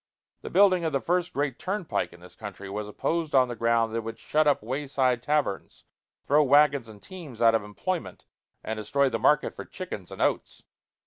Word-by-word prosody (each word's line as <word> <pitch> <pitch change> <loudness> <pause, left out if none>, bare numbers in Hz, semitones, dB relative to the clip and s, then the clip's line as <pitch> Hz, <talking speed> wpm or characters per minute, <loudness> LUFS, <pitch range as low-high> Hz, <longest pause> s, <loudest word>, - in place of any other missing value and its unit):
The - - -7
building 185 -1 +4
of 160 - -1
the 135 - +2
first 175 +4 0
great 140 -2 -2
turnpike 190 -2 -2
in 85 - -16
this 90 - -13
country 100 -2 -8
was 105 +1 -4
opposed 160 +8 -2
on 130 -1 +5
the 120 - -4
ground 115 0 +1
that - - -1
it 115 - -2
would 115 0 -6
shut 155 0 +1
up 145 -7 +2
way 135 +5 -3
side 130 -3 +1
taverns, 145 -6 -2 0.4
throw 150 +2 +4
wagons 140 -3 +4
and 105 -2 -12
teams 155 - -10
out 115 -1 +5
of 115 - +2
employment, 165 - -4 0.4
and 110 - -4
destroy 135 +6 +1
the 115 -2 -2
market 150 +5 +3
for - - -7
chickens 170 - -8
and - - -9
oats. - - -1
135 Hz, 205 wpm, -27 LUFS, 115-150 Hz, 0.4 s, on